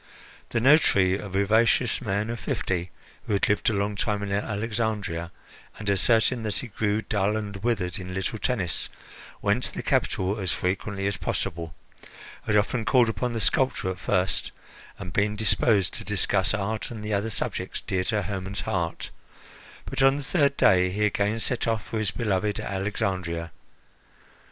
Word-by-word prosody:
The 120 - 0
notary, 110 - +5
a 100 - -7
vivacious 110 +6 +2
man 105 0 -1
of 120 - -5
fifty, 90 -3 -2 0.4
who - - 0
had 100 - +2
lived 105 +4 +2
a - - 0
long 100 +1 0
time 100 0 -1
in 100 - -4
Alexandria 105 -4 -2 0.5
and, 105 - -8
asserting 115 +5 +3
that 110 -2 -1
he 125 - -2
grew 105 +1 0
dull 105 0 0
and 105 -2 -5
withered 100 -3 -1
in 90 0 -6
little 95 +3 -2
Tennis, 95 -10 -1 0.5
went - - +2
to - - -5
the - - -4
capital 95 +3 0
as 95 -3 -1
frequently 95 +2 -2
as 100 -2 0
possible, 85 -2 -3 0.7
had 110 - +3
often 110 +3 +1
called 125 0 +4
upon 120 +2 -2
the 115 - -2
sculptor 130 -5 +1
at 95 - -7
first, 95 -2 0 0.5
and 90 -2 -7
been 105 +1 +1
disposed 105 -2 +2
to - - -2
discuss 100 -1 +1
art 105 +1 -2
and 110 -3 -7
the 105 - -2
other 100 +3 0
subjects 105 - -2
dear 95 -1 -1
to 105 +2 0
Hermon's 95 +1 -3
heart, 85 -3 -2 0.7
but - - -3
on 135 +1 +5
the 145 - -5
third 140 -1 +2
day 90 -1 +5
he 105 +3 0
again 105 +2 0
set 120 +1 0
off 115 -2 0
for 110 - -3
his 110 -3 0
beloved 105 +1 -1
Alexandria. 95 -4 -2
105 Hz, 170 wpm, -26 LUFS, 95-110 Hz, 0.7 s, notary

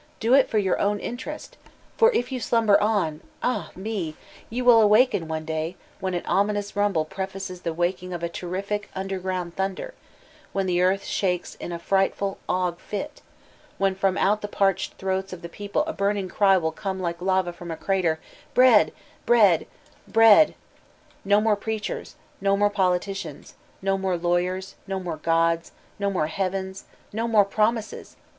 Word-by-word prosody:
Do 230 +3 +2
it 270 -1 +5
for 220 - 0
your 190 -3 +1
own 205 0 +1
interest, 295 - -7 0.4
for 460 +1 +5
if 245 +2 0
you 255 - -2
slumber 225 -3 +3
on— 195 -8 0 0.2
ah 250 - -1
ne 190 -5 -4
I - - -22
ye 245 +3 -2
will 240 -2 +7
awaken 210 -4 +4
one 160 0 -4
day 160 +2 -3 0.2
when 185 -1 -2
an 175 - -3
ominous 205 +1 0
rumbk 195 -7 0
pfe 190 0 -4
faces 185 -2 -6
the 170 - -2
waking 175 +2 -2
of 175 -1 -5
a - - +1
terrific 195 +4 -4
underground 185 -2 -3
thunder, 195 - -3 0.6
when 195 -1 0
the 180 -1 +1
earth 190 +2 +2
shakes 180 -3 -1
in - - -7
a 170 - -3
frightful 195 +2 0
ague 180 -2 0
fit, 290 +8 -6 0.6
when 195 -1 +2
from 190 0 0
oat 210 +2 +2
the 205 - -3
parched 195 -2 0
throats 190 0 -2
of 175 -1 -9
the - - -4
people 205 - -2
a 320 - -3
burning 200 -3 -1
cry 195 0 +4
will 160 -3 -1
oooie 190 +1 -4
like 170 -1 -3
lava 185 -1 +1
from 175 0 -10
a 165 - -4
crater, 180 -5 0 0.4
'"Bread, 250 -4 +6 0.4
bread, 205 -9 +5 0.4
bread 225 +7 +7
T - - -17 0.7
No 205 +1 +5
more 215 0 +3
preachers, 215 +1 -4 0.3
no 195 0 +2
more 205 0 +3
politicians, 185 -4 -2 0.3
no 195 0 +1
more 190 -2 0
lawyers* 180 +2 -1
no 195 0 -2
more 175 -4 -4
gods, 165 +1 +1 0.3
no 200 0 +1
more 185 -6 0
heavens, 190 +3 -3 0.3
no 225 +2 -1
more 215 -3 +5
promises! 215 +2 -1
195 Hz, 175 wpm, -25 LUFS, 180-210 Hz, 0.7 s, will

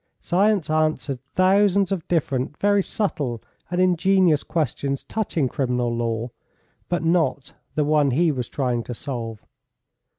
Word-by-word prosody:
Science 195 0 +2
answered 155 -4 0
thousands 195 +1 +3
of 180 -5 -2
different 140 -4 -1
very 205 0 +3
subtle 145 - -2 0.3
and 180 - -1
ingenious 185 -3 +3
questions 140 -3 -2
touching 180 -10 -1
criminal 125 -2 -1
law, 115 0 -2 0.6
but 175 -2 -1
not 165 -4 +1 0.2
the 150 - +2
one 150 -1 +3
he 160 +6 +2
was 125 -4 -4
trying 125 -4 -1
to 120 +1 -6
solve. 115 -4 -6
155 Hz, 130 wpm, -23 LUFS, 125-185 Hz, 0.6 s, thousands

